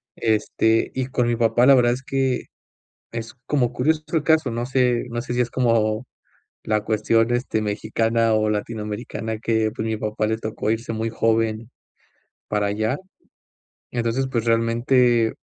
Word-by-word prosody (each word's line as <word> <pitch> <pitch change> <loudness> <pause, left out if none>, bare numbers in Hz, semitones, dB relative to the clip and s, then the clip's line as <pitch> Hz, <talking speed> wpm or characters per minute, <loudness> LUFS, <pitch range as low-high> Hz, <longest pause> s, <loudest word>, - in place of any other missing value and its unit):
Este, 110 0 +1
y 130 -1 -1
con 125 -2 0
mi 120 - +1
papá, 115 +1 +3
la 140 - +8
verdad 120 -1 +4
es 130 - -6
que 130 0 0 0.7
es 115 +1 -6
como 125 -5 +1
curioso 155 +5 +1
el 160 -3 +2
caso. 160 -5 +3
No 120 +1 -2
sé, 125 -2 +1
no 120 0 -3
sé 120 0 -5
si 120 - -1
es 120 - -1
como 115 -2 +1 0.6
la 110 -1 0
cuestión, 115 +2 +2
este, 120 -3 0
mexicana 115 +2 0
o 110 0 +2
latinoamericana 110 +1 -4
que, 110 -1 +1
pues, 110 - -4
mi 110 - -1
papá 110 0 -2
le 110 0 0
tocó 110 -1 -2
irse 115 +1 -2
muy 110 +1 -2
joven 115 0 0 0.8
para 105 -1 0
allá. 110 +6 -1 1.0
Entonces, 120 +2 -1
pues, 115 -3 -1
realmente, 115 +1 +3
115 Hz, 160 wpm, -22 LUFS, 110-125 Hz, 1.0 s, la